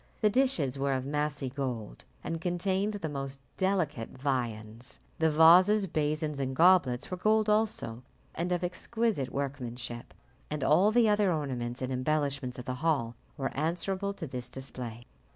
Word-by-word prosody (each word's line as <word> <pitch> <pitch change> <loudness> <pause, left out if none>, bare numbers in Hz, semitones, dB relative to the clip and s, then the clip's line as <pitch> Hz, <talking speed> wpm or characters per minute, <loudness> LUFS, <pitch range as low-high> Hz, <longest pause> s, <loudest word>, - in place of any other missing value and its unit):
The 210 -2 +4
dishes 190 - +1
were 140 0 +1
of 130 0 -2
massy 145 -1 -1
gold, 125 - -5 0.2
and 165 -1 -4
contained 190 +4 0
the 185 -6 -3
most 135 -2 -4 0.2
delicate 175 - 0
viands. 120 -4 -3 0.2
The 160 0 +4
vases, 180 +7 +6
basins, 155 -3 -1
and 130 -1 -2
goblets 165 -7 +4
were 185 - -2
gold 215 +3 +2
also, 210 - +1 0.3
and 175 +2 -2
of 175 0 0
exquisite 180 - -1
workmanship, 125 -4 -5 0.3
and 150 -2 -3
all 180 +9 +5
the 235 0 +4
other 205 -2 +3
ornaments 130 -5 -3
and 130 +1 -2
embellishments 135 -1 -1
of 125 - -7
the 130 - -2
hall 140 -8 +1 0.2
were 135 -2 -3
answerable 185 +6 -1
to 170 - -5
this 125 -3 -6
display. 125 -3 -6
150 Hz, 150 wpm, -30 LUFS, 130-180 Hz, 0.3 s, vases